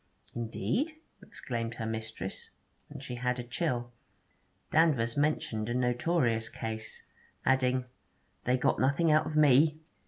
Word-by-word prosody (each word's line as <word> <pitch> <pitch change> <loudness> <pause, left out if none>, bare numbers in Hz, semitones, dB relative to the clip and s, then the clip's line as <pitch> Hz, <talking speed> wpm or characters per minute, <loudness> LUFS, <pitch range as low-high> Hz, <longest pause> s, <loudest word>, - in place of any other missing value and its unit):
'Indeed!' 170 - -1 0.3
exclaimed 115 -2 -5
her 115 - -4
mistress; 110 -3 -5 0.4
and 140 -2 -9
she 130 - -6
had 125 0 0
a 125 - -4
chill. 120 -2 -2 0.8
Danvers 140 -8 +3
mentioned 130 -7 0
a 120 - -1
notorious 125 -2 +1
Case, 110 -1 -5 0.4
adding, 130 -1 +2 0.6
'They 125 +1 +3
got 125 - +1
nothing 140 +5 +3
out 155 +1 +4
of 155 - -4
me.' 150 +1 +5
125 Hz, 125 wpm, -30 LUFS, 115-150 Hz, 0.8 s, me